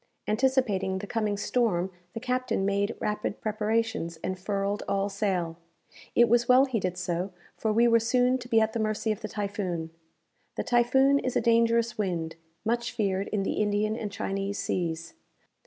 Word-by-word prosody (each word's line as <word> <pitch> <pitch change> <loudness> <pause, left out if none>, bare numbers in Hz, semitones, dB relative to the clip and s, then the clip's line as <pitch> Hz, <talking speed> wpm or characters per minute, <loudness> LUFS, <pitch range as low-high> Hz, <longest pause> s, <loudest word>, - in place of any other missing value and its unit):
Anticipating 215 -5 +1
the 195 - -5
coming 215 -2 -1
storm, 200 -5 0 0.2
the - - -2
captain 250 -4 -1
made 200 +2 0
rapid 210 -1 -2
preparations, 215 -4 -1
and 185 0 -3
furled 200 +1 -1
all 200 0 0
sail. 185 -5 -1 0.6
It 235 - +6
was 235 +1 +3
well 255 +2 +7
he 255 -5 -1
did 185 -1 -2
so; 180 +1 -2 0.2
for 220 - -1
we 230 +2 +4
were 230 0 +5
soon 250 +2 +2
to 245 - -9
be 225 - +5
at 220 0 +1
the 230 - -1
mercy 215 0 0
of 215 - -3
the 215 - -3
typhoon. 195 -6 -3 0.6
The - - -2
typhoon 265 +3 +4
is 255 - -3
a - - +4
dangerous 230 0 +2
wind, 170 -5 -2 0.3
much 235 +1 0
feared 195 -3 0
in 205 -2 -1
the 195 - -1
Indian 210 +1 +1
and 215 -3 -4
Chinese 195 0 -3
seas. 165 -2 -2
210 Hz, 170 wpm, -28 LUFS, 195-235 Hz, 0.6 s, well